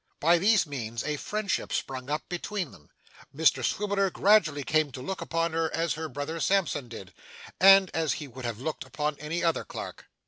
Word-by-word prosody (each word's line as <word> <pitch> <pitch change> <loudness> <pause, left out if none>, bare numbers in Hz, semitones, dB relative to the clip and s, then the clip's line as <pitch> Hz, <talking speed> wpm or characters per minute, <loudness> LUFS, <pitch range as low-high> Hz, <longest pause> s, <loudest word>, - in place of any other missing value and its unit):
By 170 +3 +4
these 210 +1 +4
means 120 -6 -5
a 150 - -1
friendship 210 +4 -2
sprung 130 0 -3
up 150 +1 -2
between 180 -1 -4
them. 75 - -18 0.5
Mr 140 -4 +3
Swiveller 200 - +1
gradually 175 -8 +3
came 155 0 +1
to - - -7
look 190 +9 -5
upon 165 0 -1
her 165 0 0
as 165 -3 0
her 160 +1 -5
brother 145 +5 -4
Sampson 175 -7 +1
did, 95 -5 -10 0.5
and 195 0 +7
as 160 -2 +1
he 150 - -6
would 130 0 -10
have 115 -2 -4
looked 155 +4 -4
upon 150 0 -2
any 155 +3 -3
other 165 -1 +1
clerk. - - -8
160 Hz, 185 wpm, -28 LUFS, 140-180 Hz, 0.5 s, and